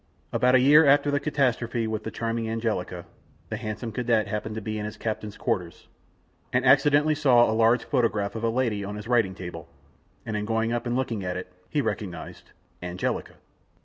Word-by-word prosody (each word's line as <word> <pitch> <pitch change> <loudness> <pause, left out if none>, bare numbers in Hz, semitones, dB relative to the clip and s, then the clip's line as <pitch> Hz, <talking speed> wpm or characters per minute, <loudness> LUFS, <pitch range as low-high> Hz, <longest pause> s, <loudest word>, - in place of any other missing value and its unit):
About 125 +1 +4
a - - +7
year 145 +5 +7
after 145 0 +4
the 145 - +1
catastrophe 125 -5 0
with 110 -1 -3
charming 115 0 -2
Angelica, 110 -6 -3 0.4
the - - -3
handsome 110 +2 -5
cadet 115 -2 +1
happened 105 +1 -4
to - - -2
be 110 0 -4
in 105 - -4
his 105 - -7
captain's 105 -2 -4
quarters, 85 -3 -3 0.6
and 125 +1 +1
accidentally 145 +3 +5
saw 135 -6 +5
a 110 - 0
large 115 +2 +3
photograph 115 -7 0
of 115 - -6
a 115 - +2
lady 115 -4 0
on 105 +1 -5
his 105 +1 -8
writing 115 -6 +2
table, 85 -3 -8 0.6
and 110 -2 -3
on 105 0 -2
going 115 +1 0
up 120 0 -2
and 120 - -1
looking 120 -6 -2
at 90 0 -3
it, 90 0 -8 0.2
he 150 - +1
recognized 100 -7 -5 0.3
Angelica. 90 0 -3
115 Hz, 185 wpm, -26 LUFS, 105-125 Hz, 0.6 s, a